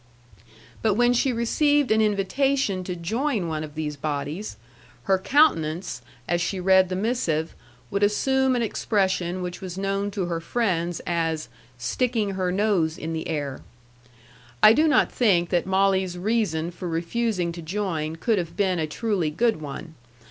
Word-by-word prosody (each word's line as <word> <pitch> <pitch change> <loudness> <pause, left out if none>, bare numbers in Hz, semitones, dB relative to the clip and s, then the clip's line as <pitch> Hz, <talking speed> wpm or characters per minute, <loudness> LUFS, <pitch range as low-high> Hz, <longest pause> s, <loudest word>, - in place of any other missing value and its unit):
But 215 -3 +2
when 245 +2 +4
she 255 +2 +2
received 285 +4 +2
an 220 0 +4
invitation 210 +1 +1
to 180 - -3
join 220 - -1
one 155 -1 -3
of 150 -1 -9
these 150 -1 -3
bodies, 145 - -4 0.5
her 190 -1 +2
countenance, 175 - +2 0.3
as 175 0 +1
she 185 +2 -2
read 190 0 +4
the 185 - -2
missive, 185 -7 -1 0.4
would 200 - -1
assume 265 +5 +2
an 240 - +1
expression 190 -5 0
which 180 0 -6
was 185 -1 -6
known 195 +1 -1
to 200 -2 -2
her 170 -1 -2
friends 175 -3 -1
as 165 -2 -1 0.3
"sticking 220 - 0
her 185 -2 -1
nose 185 -5 +1
in 160 +1 -4
the 160 - -4
air." 145 -4 -3 1.0
I 215 - +9
do 310 +6 +3
not 300 - +3
think 180 -8 +2
that 175 0 +1
Molly's 190 -1 +2
reason 175 -5 0
for 180 +1 -7
refusing 175 +2 -1
to 170 0 -8
join 165 -3 -3
could 215 +5 +1
have 170 0 -6
been 190 -4 +1
a 155 - -1
truly 195 -1 -1
good 220 +3 0
one. 150 +3 -7
185 Hz, 160 wpm, -24 LUFS, 165-220 Hz, 1.0 s, I